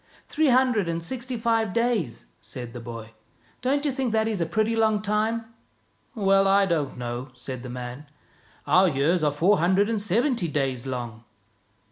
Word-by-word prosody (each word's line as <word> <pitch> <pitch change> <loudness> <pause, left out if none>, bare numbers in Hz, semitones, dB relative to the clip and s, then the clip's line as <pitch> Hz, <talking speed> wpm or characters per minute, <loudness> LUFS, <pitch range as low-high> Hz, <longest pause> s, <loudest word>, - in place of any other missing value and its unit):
" - - -30
Three 315 0 +1
hundred 250 -7 +3
and 165 0 -2
sixty 250 +6 -4
five 225 -3 +1
days," 230 - 0 0.2
said 120 -2 -6
the 120 - -6
boy. 115 -1 -8 0.2
" - - -34
Don't 280 +4 0
you 290 - +2
think 260 -2 -1
that 220 0 +2
is 210 -5 -2
a 165 - 0
pretty 220 +5 0
long 220 -2 +2
time? 225 +2 -1 0.2
" - - -40
" - - -40
Well, 195 -2 +3
I 195 +1 +5
don't 155 -8 -1
know," 120 +2 -5
said 130 0 -7
the 130 - -8
man. 125 +3 -7 0.3
" - - -31
Our 185 +1 +5
years 155 +4 +1
are 150 - +3
four 180 +8 +3
hundred 190 +6 +3
and 220 -3 -1
seventy 225 - +1
days 135 -4 -2
long." 120 -3 -5
195 Hz, 195 wpm, -25 LUFS, -, 0.3 s, I